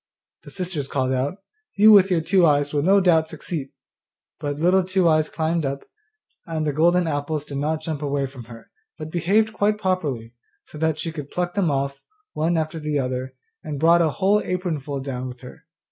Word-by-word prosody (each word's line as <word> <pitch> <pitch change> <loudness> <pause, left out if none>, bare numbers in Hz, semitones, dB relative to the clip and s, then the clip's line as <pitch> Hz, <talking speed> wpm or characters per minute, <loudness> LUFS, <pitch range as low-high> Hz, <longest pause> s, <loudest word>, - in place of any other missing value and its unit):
The - - -13
sisters 180 -7 -3
called 130 -2 -1
out, 145 +10 -2 0.3
'You 215 +2 +8
with 200 -2 +7
your 175 -3 +2
two 180 +3 +3
eyes 145 -2 +3
will 145 - +1
no 195 +6 +4
doubt 165 -4 +3
succeed!' 155 -3 -5 0.7
But 145 -1 -3
Little 180 +4 +3
Two 185 -1 +1
eyes 155 -1 +3
climbed 160 +1 -1
up, 135 0 -3 0.6
and 160 -2 -2
the 150 - 0
golden 175 +4 +3
apples 150 -1 -2
did 140 -2 -5
not 155 +2 -1
jump 155 -2 -4
away 140 -1 -1
from 130 -3 -10
her, 115 0 -13 0.3
but 155 0 -7
behaved 205 +6 +1
quite 210 0 +1
properly, 150 - -2 0.3
so 150 - -12
that 160 -1 +1
she 165 - -3
could 150 -3 -7
pluck 175 0 -2
them 195 -5 +1
off, 140 0 -2 0.3
one 165 +2 0
after 160 0 -2
the 150 -1 -2
other, 130 0 -3 0.3
and 150 -3 -5
brought 170 +2 +5
a 165 - +3
whole 200 +5 +2
apron 180 -4 -2
full 140 0 -5
down 130 -2 -4
with 125 0 -10
her. 160 +6 -13
155 Hz, 200 wpm, -23 LUFS, 140-175 Hz, 0.7 s, You